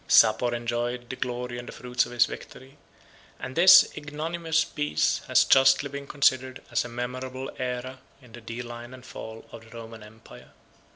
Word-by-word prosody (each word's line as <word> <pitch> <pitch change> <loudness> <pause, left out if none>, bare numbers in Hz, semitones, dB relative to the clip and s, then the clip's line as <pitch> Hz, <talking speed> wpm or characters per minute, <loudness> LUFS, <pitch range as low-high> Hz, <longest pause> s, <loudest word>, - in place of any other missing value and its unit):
Sapor 120 +2 +5
enjoyed 120 +1 -3
the - - -5
glory 125 -1 -4
and 120 - -9
the - - -7
fruits 125 0 -1
of - - -11
his 120 -1 +4
victory; 135 +2 -11 0.6
and 130 - -7
this 185 +2 +8
ignominious 160 +2 -2
peace 110 - 0
has - - +5
justly 135 +1 +4
been 140 0 -7
considered 130 -2 +1
as - - +1
a 120 - -8
memorable 130 +2 -5
æra 130 +1 -4 0.2
in 125 -4 -18
the 120 +1 -11
decline 120 +2 -8
and 125 -1 -15
fall 110 0 -9
of 115 - -10
the 115 +1 -13
Roman 115 -1 -10
empire. 105 +1 -15
125 Hz, 170 wpm, -26 LUFS, 120-135 Hz, 0.6 s, this